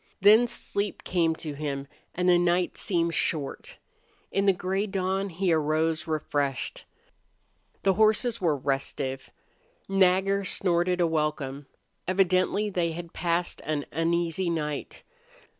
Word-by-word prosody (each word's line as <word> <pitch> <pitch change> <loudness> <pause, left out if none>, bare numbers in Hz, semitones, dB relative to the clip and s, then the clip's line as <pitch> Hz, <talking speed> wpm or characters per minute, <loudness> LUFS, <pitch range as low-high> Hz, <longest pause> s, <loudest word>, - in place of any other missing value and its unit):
Then 215 +5 +6
sleep 205 -3 -3
came 165 -3 +1
to 155 -2 -6
him 140 -1 -4 0.3
and 180 +1 0
the 175 -1 +6
night 175 +1 +1
seemed 170 -3 0
short. 150 -3 -2 0.5
In 195 0 +1
the - - +8
gray 190 +3 -2
dawn 195 0 -1
he 180 0 0
arose 155 +1 0
refreshed. 145 -4 -2 1.0
The 195 - +4
horses 220 +3 +2
were 160 -5 +2
restive. 135 -1 -2 0.6
Nagger 195 +1 +3
snorted 180 -1 +1
a - - +4
welcome. 150 -3 -2 0.4
Evidently 185 +2 +2
they 170 -3 0
had 170 0 -8
passed 175 0 -1
an 150 -2 -2
uneasy 170 +2 0
night. 150 -3 -4
175 Hz, 125 wpm, -27 LUFS, 155-190 Hz, 1.0 s, the